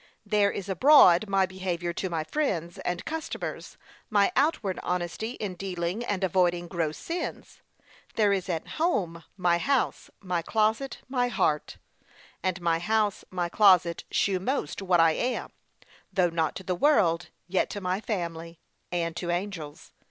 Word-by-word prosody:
There 205 -1 +3
is 195 - -5
abroad, 200 - +6
my 195 -1 +3
behaviour 180 -2 -3
to 190 - -3
my 165 -2 -2
friends, 175 - -2
and 175 -1 -3
customers, 320 0 -5 0.3
my 205 -3 +3
outward 255 - +1
honesty 180 +6 -3
in 205 -6 -4
dealing 180 +3 -3
and 205 -4 -2
avoiding 175 -1 +2
gross 165 -4 -2
sins. 335 +1 -5 0.5
There 210 -2 +3
is 190 -1 -2
at 165 -3 -2
home, 185 - 0
my 175 -2 +2
house, 275 +5 0
my 180 -3 -2
closet, 220 +8 0
my 250 -1 +1
heart; 150 -10 0 0.6
and 185 -1 -1
my 165 -1 +1
house, 210 +2 0
my 180 -2 -2
closet, 180 -3 +4
shew 195 -2 +1
most 200 - -2
what 180 -3 +2
I 165 -1 +6
am: 245 +10 -2 0.6
though 185 -3 +2
not 165 -2 0
to 190 - -7
the 185 - -1
world, 180 - +3 0.2
yet 185 +1 +1
to 205 - -5
my 185 0 -1
family, 170 -5 -4 0.3
and 170 -2 -1
to 175 0 -4
angels. 175 -4 -4
185 Hz, 150 wpm, -27 LUFS, 170-210 Hz, 0.6 s, abroad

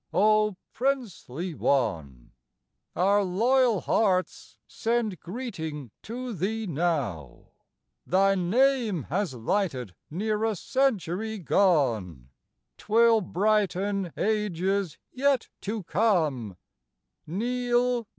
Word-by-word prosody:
O 215 0 +3 0.2
princely 200 - -2
one! 85 - -1 0.6
Our 200 +3 +3
loyal 230 +3 +2
hearts 185 -4 0
send 225 -6 -1
greeting 160 - -6
to 245 +2 -6
thee 215 +5 -2
now; 140 - -2 0.6
Thy 195 +2 +4
name 215 - +2
has 180 -3 -1
lighted 125 - -1 0.2
near 210 +6 -1
a 225 -1 +1
century 220 - -1
gone, 120 - +1 0.5
'Twill 225 +1 +4
brighten 195 -1 0
ages 200 -4 0
yet 275 -1 +1
to 210 0 -4
come, 155 - 0 0.7
Neal 245 +5 0
Dow. 225 - -19
195 Hz, 90 wpm, -27 LUFS, 160-225 Hz, 0.7 s, Thy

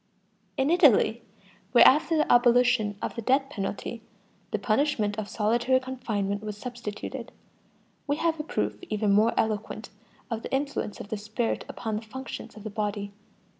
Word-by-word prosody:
In 270 +3 +2
Italy, 275 - +5 0.5
where 240 - +8
after 315 +4 +4
the 305 - +2
abolition 240 -4 +4
of - - -2
the 235 - -5
death 270 +4 +2
penalty 205 +1 -4 0.5
the - - -1
punishment 215 -1 +1
of 210 - -5
solitary 240 +4 +2
confinement 215 -6 -3
was 210 -1 -6
substituted, 235 -2 -6 0.8
we 285 - +1
have 325 0 0
a - - -2
proof 315 - -2
even 210 -1 +1
more 215 +3 +4
eloquent 215 0 -2 0.4
of 225 -1 -2
the - - -7
influence 275 -6 -2
of 200 - -8
the 220 - -2
spirit 215 +3 -2
upon 220 -2 -3
the - - -4
functions 260 +4 -8
of 210 - -11
the 215 - -5
body. 205 -1 -3
225 Hz, 160 wpm, -27 LUFS, 210-260 Hz, 0.8 s, where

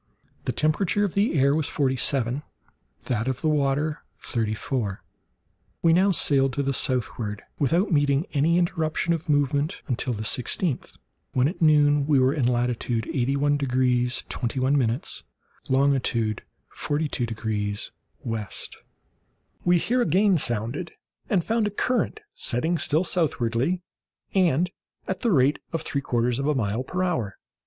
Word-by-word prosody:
The - - 0
temperature 175 +6 +1
of 200 - -1
the 200 -4 +1
air 140 +1 +4
was 155 0 0
forty 135 -4 0
seven, 130 0 0 0.6
that 115 -1 -1
of 130 -1 -2
the - - 0
water 150 +1 0 0.2
thirty 110 -2 -1
four. 110 -5 -3 0.8
We 165 -1 +5
now 185 +4 +4
sailed 135 -6 +3
to 140 - -1
the 140 0 0
southward 115 -5 -1 0.2
without 170 - +2
meeting 145 0 +2
any 160 +4 +3
interruption 170 -1 0
of 165 -1 -4
moment 145 +3 +1
until 125 -2 -1
the 110 -1 -4
sixteenth, 125 - -1 0.4
when, 130 +1 +3
at 175 +4 -5
noon, 145 -2 +4
we 150 -2 +4
were 130 +1 +4
in 140 -6 +1
latitude 120 -2 0
81 140 +2 +1
degrees 125 -2 +1
21', 130 0 0 0.7
longitude 130 -5 +1 0.3
42 145 -4 -2
degrees 105 -2 -3 0.3
W. 115 -2 -2 1.2
We 175 0 +4
here 245 +8 +1
again 200 -5 +3
sounded, 120 +8 -2 0.4
and 185 -5 +2
found 225 -1 +1
a - - 0
current 255 - -1
setting 160 +8 +1
still 155 +4 +2
southwardly, 155 -1 0 0.5
and 180 -2 +2 0.4
at 190 - -2
the 235 - +2
rate 140 -2 +3
of 165 -1 -2
three 140 - -2
quarters 120 -1 0
of 140 - -1
a 150 - +2
mile 110 -1 -1
per 180 +7 -2
hour. 120 - -1
140 Hz, 145 wpm, -25 LUFS, 125-165 Hz, 1.2 s, We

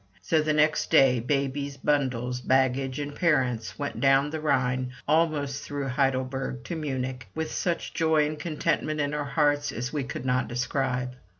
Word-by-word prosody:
So 155 - +2
the 155 0 0
next 155 0 +2
day, 130 -2 +5
babies, 140 +2 -1
bundles, 125 -4 0
baggage, 130 0 +1
and 145 0 -4
parents 130 -9 0
went 145 -1 -4
down 135 +1 +4
the 160 -1 -4
Rhine, 130 -3 0
almost 150 -3 +1
through 140 -1 -4
Heidelberg, 130 -1 -1
to 170 - -5
Munich, 130 -6 -3
with 160 -1 -3
such 175 -2 -2
joy 160 -2 +3
and 150 0 -4
contentment 155 -1 -1
in 145 0 0
our 150 -1 -2
hearts 145 0 +1
as 125 +4 -4
we 145 -3 -1
could 130 - -6
not 130 0 +1
describe. 125 0 -1
140 Hz, 165 wpm, -27 LUFS, 130-150 Hz, -, day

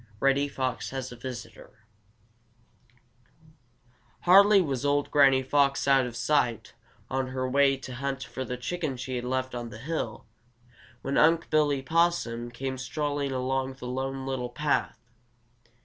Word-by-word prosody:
Reddy 140 +1 +2
Fox 130 -4 -3
Has 130 -1 -5
a - - -8
Visitor 120 -3 -9 2.4
Hardly 200 +3 +7
was 140 -8 -1
old 145 0 +1
Granny 135 -2 +5
Fox 140 +1 +2
out 135 -2 +4
of 120 - -8
sight 125 -4 0 0.3
on 130 0 -1
her 130 0 -3
way 135 +1 +3
to 130 -1 -9
hunt 135 0 -3
for 130 - -6
the 125 -1 -5
chicken 150 +1 -3
she 130 +1 -5
had 120 0 -3
left 130 0 -2
on 120 -1 -5
the 105 - -10
hill, 155 +8 -4 0.8
when 135 - 0
Unc' 165 +2 +3
Billy 145 -3 +2
Possum 160 -7 +1
came 130 +2 -5
strolling 145 +1 -2
along 130 +1 -1
the 130 - -10
Lone 130 +1 -3
Little 130 -2 -3
Path. 145 -1 -1
135 Hz, 145 wpm, -27 LUFS, 125-145 Hz, 2.4 s, Hardly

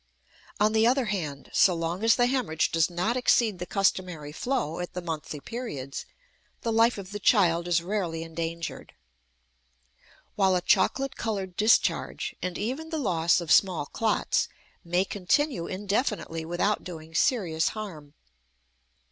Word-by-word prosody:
On 210 +1 +3
the 220 +1 +4
other 260 +1 +2
hand, 165 -10 -4
so 185 -4 +5
long 165 +4 -3
as 225 0 +5
the 245 - +3
hemorrhage 245 - 0
does 165 0 +2
not 180 +7 -1
exceed 235 -5 +2
the 180 - -5
customary 180 -6 0
flow 180 - -2
at 175 - -5
the 180 - -3
monthly 160 -3 -5
periods, 140 - -6 0.6
the 230 - 0
life 230 +1 +4
of 195 -1 -8
the 205 - -5
child 175 -5 +3
is 170 -1 +2
rarely 175 -4 -2
endangered; 165 0 -5 1.4
while 190 -2 +3
a 180 - +1
chocolate 270 +8 +2
colored 195 -5 -3
discharge, 215 +4 +2
and 180 -1 -3
even 265 +10 -3
the 320 - -3
loss 170 - +2
of 170 -3 -4
small 180 -7 +4
clots, 225 - 0 0.3
may 175 +2 +1
continue 205 - 0
indefinitely 200 - -2
without 175 +5 0
doing 160 -3 -9
serious 170 - +1
harm. 160 -9 -8
185 Hz, 145 wpm, -27 LUFS, 165-220 Hz, 1.4 s, so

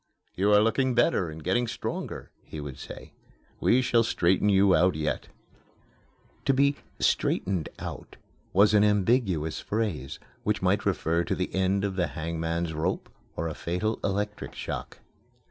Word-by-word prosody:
"You 100 +3 +2
are 105 0 +7
looking 120 +3 +2
better 105 -7 +2
and 80 0 -9
getting 120 +7 +1
stronger," - - -5
he 80 - -8
would 70 -3 -7
say. - - -10 0.5
"We 130 +1 +3
shall 120 -2 +3
straighten 95 -2 +2
you 100 -1 +5
out 90 0 +4
yet." 75 0 -2 1.2
To 135 - +3
be 140 +1 +3 0.2
"straightened 90 -5 +1
out" - - -8 0.3
was 100 +3 +5
an 105 -1 +6
ambiguous 100 - +2
phrase 100 - -2 0.2
which - - 0
might - - +2
refer 85 +2 +1
to - - -1
the 90 - -3
end 95 +1 +1
of 100 -2 -2
the 90 -2 +2
hangman's 80 +1 -2
rope 80 0 -2 0.3
or 85 - -2
to 80 - -2
a - - -5
fatal 90 +8 -2
electric 105 +1 -2
shock. - - -6
95 Hz, 155 wpm, -27 LUFS, 85-105 Hz, 1.2 s, are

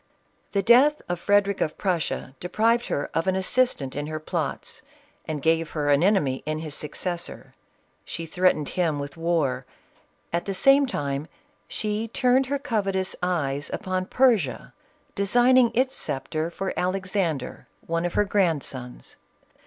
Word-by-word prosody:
The 200 -1 +1
death 270 +8 +6
of 175 -1 -2
Frederic 200 +1 +2
of 155 - -1
Prussia 170 -8 -2
deprived 230 +6 +1
her 140 - -2
of 165 +3 0
an 190 - +2
assistant 190 - +1
in 145 +1 -3
her 155 0 -4
plots, 155 - -4 0.5
and 150 -3 -4
gave 165 0 +2
her 145 -2 +1
an 140 +1 +4
enemy 175 -9 +2
in 155 0 -1
his 155 -2 -6
successor. 170 +4 -4 0.5
She 165 - -6
threatened 165 -3 +1
him 165 -5 0
with 140 0 -6
war; 160 -6 0 0.7
at 170 - 0
the 195 - -3
same 275 +6 +5
time 140 - -3 0.4
she 215 +1 -2
turned 250 +3 +2
her 280 +1 0
covetous 200 -9 -1
eyes 145 -6 -1
upon 185 -2 -2
Persia, 210 - +2 0.4
designing 245 +5 +4
its 260 +2 +2
sceptre 155 +4 -2
for 190 +3 -4
Alexander, 185 -6 -2 0.2
one 165 0 -1
of 175 - -2
her 205 - +3
grandsons. 150 -11 -2
180 Hz, 145 wpm, -25 LUFS, 155-210 Hz, 0.7 s, death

